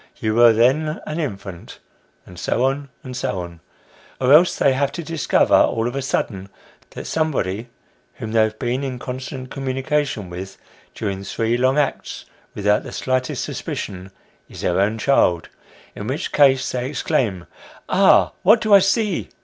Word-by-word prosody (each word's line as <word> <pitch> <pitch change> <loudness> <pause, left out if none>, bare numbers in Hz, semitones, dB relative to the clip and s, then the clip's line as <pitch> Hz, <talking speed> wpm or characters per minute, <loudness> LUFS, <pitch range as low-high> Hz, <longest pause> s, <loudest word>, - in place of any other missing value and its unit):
You 110 - -1
were 120 +1 +7
then 135 +8 +2
an 155 +2 -4
infant," 100 - -6 0.5
&c., - - -14 0.2
&c. 130 -1 -2
Or 90 -3 -5 0.7
else 150 +7 +5
they 135 - +3
have 140 +1 0
to 170 - -5
discover, 160 -3 +1
all 115 +1 +3
of 120 - -4
a 135 - -1
sudden, 100 -7 -2 0.4
that - - -8
somebody 120 - -2 0.5
whom 110 - -6
they 115 0 +3
have 110 0 0
been 125 +3 -2
in 130 -2 -4
constant 130 +1 -7
communication 135 -4 -2
with, 95 +2 -7 0.4
during 100 -3 -4
three 115 +3 -1
long 130 +3 +2
acts, 150 - -2 0.3
without 105 0 +2
the - - -9
slightest 130 0 -2
suspicion, 95 -1 -5 0.4
is - - -10
their 90 - 0
own 105 +3 +1
child: 90 -9 +2 0.5
in 105 - -6
which 140 +8 -3
case 135 -3 +4
they 125 +1 -3
exclaim, 115 - -1 0.2
" - - -21
Ah! - - +4
what 215 +5 +6
do 215 -2 +1
I 200 - +10
see 195 0 0
130 Hz, 155 wpm, -21 LUFS, 105-140 Hz, 0.7 s, I